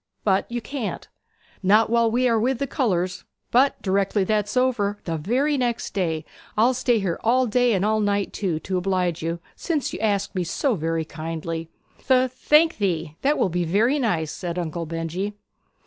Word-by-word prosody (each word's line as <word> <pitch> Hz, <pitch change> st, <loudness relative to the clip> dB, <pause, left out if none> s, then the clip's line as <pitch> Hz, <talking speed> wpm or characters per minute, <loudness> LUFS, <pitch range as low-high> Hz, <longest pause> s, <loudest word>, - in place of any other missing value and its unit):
But 195 Hz, +2 st, +1 dB
you 240 Hz, 0 st, -2 dB
can't!' 250 Hz, -1 st, -5 dB, 0.5 s
'Not 210 Hz, +4 st, +4 dB
while 235 Hz, -1 st, +4 dB
we 250 Hz, +3 st, +2 dB
are 230 Hz, -2 st, +3 dB
with 250 Hz, +3 st, +1 dB
the 280 Hz, -, -1 dB
colours. 185 Hz, -, -1 dB, 0.3 s
But 265 Hz, +3 st, +3 dB
directly 195 Hz, +1 st, +1 dB
that's 210 Hz, +2 st, 0 dB
over 225 Hz, -6 st, +1 dB
the 165 Hz, -, -2 dB
very 255 Hz, -, +1 dB
next 240 Hz, -2 st, -1 dB
day 165 Hz, -5 st, -1 dB, 0.3 s
I'll 235 Hz, +4 st, +4 dB
stay 245 Hz, -1 st, +2 dB
here 190 Hz, -5 st, -1 dB
all 255 Hz, +3 st, +3 dB
day, 245 Hz, +1 st, +2 dB
and 195 Hz, 0 st, +1 dB
all 215 Hz, 0 st, +2 dB
night 205 Hz, -1 st, 0 dB
too, 185 Hz, -6 st, -1 dB
to 185 Hz, -1 st, -1 dB
oblige 180 Hz, -2 st, 0 dB
you, 165 Hz, +1 st, -2 dB, 0.2 s
since 315 Hz, -5 st, -2 dB
you -, -, -5 dB
ask 200 Hz, -2 st, 0 dB
me 185 Hz, -2 st, -1 dB
so 245 Hz, -, 0 dB
very 165 Hz, -3 st, -1 dB
kindly.' 165 Hz, +1 st, -5 dB, 0.3 s
'Th 255 Hz, -1 st, +2 dB
thank 300 Hz, -1 st, +3 dB
ye, 165 Hz, -5 st, -1 dB
that 290 Hz, +2 st, +2 dB
will 195 Hz, -, +2 dB
be 175 Hz, +1 st, -1 dB
very 220 Hz, -, +2 dB
nice!' 165 Hz, -, 0 dB
said 175 Hz, -1 st, -5 dB
Uncle 170 Hz, -1 st, -3 dB
Benjy. 165 Hz, +5 st, -3 dB
205 Hz, 180 wpm, -24 LUFS, 175-240 Hz, 0.5 s, Not